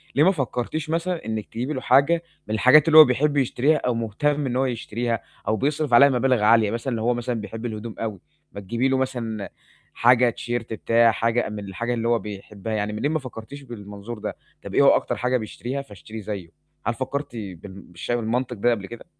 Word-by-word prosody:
ليه 145 - +5
ما 190 - +6
فكّرتيش 145 0 -3
مثلًا، 165 -3 -2
إنك 110 -2 -3
تجيبي 125 +6 -4
له 130 - -4
حاجة 140 +7 +3 0.2
من 110 - -3
الحاجات 140 +7 +6
اللي 155 -1 +6
هو 155 - +12
بيحب 145 +3 +1
يشتريها 140 +3 +2
أو 125 - -1
مهتم 135 +6 -1
إن 125 -1 -2
هو 130 - +2
يشتريها، 115 -1 -2 0.3
أو 110 - +2
بيصرف 145 -1 -1
عليها 140 +4 +8
مبالغ 125 -3 +2
عالية 110 -1 +5
مثلًا، 120 +1 -2
لو 110 - -3
هو 120 +1 +2
مثلًا 120 -2 -3
بيحب 110 +3 -7
الهدوم 110 -1 -5
أوي، 110 -4 -4 0.3
ما 100 - -8
تجيبي 120 +7 0
له 135 - +2
مثلًا 115 -6 -3 0.4
حاجة 120 0 +4
T-shirt 120 -1 -3
بتاع، 115 +1 +3
حاجة 115 +1 0
من 105 -1 -6
الحاجة 105 +5 -3
اللي 115 0 -1
هو 120 -1 +3
بيحبها 105 +1 -7
يعني. 105 0 -1
منين 145 +8 -1
ما 155 - 0
فكّرتيش 130 +1 -9
بالمنظور 105 -2 -8
ده، - - -5 0.3
طَب - - -8
إيه - - +5
هو - - +7
أكتر - - +2
حاجة 125 +1 +1
بيشتريها 125 +4 -5
فاشتريه 110 -2 -10
زيُّه؟ 100 -4 -6 0.4
هل 115 - +1
فكّرتِ 130 +1 -4
بال 100 -5 -6 0.3
بالش 85 +6 -7
بالمنطق 120 +2 -1
ده 120 +4 +2
قبل 105 -4 -2
كده؟ 120 - -10
120 Hz, 205 wpm, -24 LUFS, 110-135 Hz, 0.4 s, هو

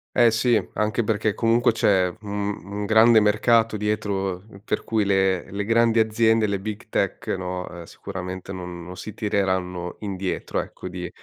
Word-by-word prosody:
Eh, 120 -2 +5
sì. 115 -1 +3
Anche 105 +2 0
perché 105 -1 0
comunque 115 +2 +3
c'è 95 -5 +2
un 100 0 -3 0.2
un 100 +2 -5
grande 110 +1 +6
mercato 110 +2 +3
dietro, 100 -3 -2 0.2
per 105 - -1
cui 110 -2 0
le 95 -2 +1
le 100 +1 -2
grandi 115 +1 +3
aziende, 110 0 +3
le 100 -1 -1
big 105 +1 -6
tech, - - -2
no, 90 -1 -3
ehm, 85 -1 -9
sicuramente 95 +1 -7
non 90 -2 -7
non 90 +2 -9
si 110 - -8
tireranno 95 -4 -1
indietro, 95 -3 -3
ecco, - - -7
di 90 -1 -6
100 Hz, 160 wpm, -24 LUFS, 95-110 Hz, 0.2 s, grande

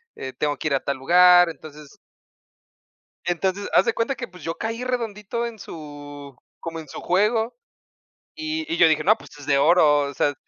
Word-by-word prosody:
eh, 130 0 -7
tengo 145 -2 -2
que - - -3
ir 140 - +1
a 135 - -2
tal 140 -1 -2
lugar. 175 +4 +6
Entonces 150 -2 -12 1.3
Entonces, 190 +3 -1
haz - - +5
de 230 - +1
cuenta 230 +4 -1
que, - - -6
pues, 180 -1 -15
yo 165 0 -3
caí 230 +2 -4
redondito 235 -2 -3
en 225 -2 -9
su, 145 -5 -10 0.2
como 165 -1 -6
en 155 - -10
su - - -9
juego, 220 +5 +1 0.8
y 315 0 -4
y - - 0
yo - - +6
dije, 155 -1 +2
no, 215 +6 +4
pues, - - -15
es 140 - -11
de 140 -1 +3
oro, 150 -2 +5
o 140 - -8
sea 145 +2 +1
175 Hz, 195 wpm, -23 LUFS, 145-225 Hz, 1.3 s, lugar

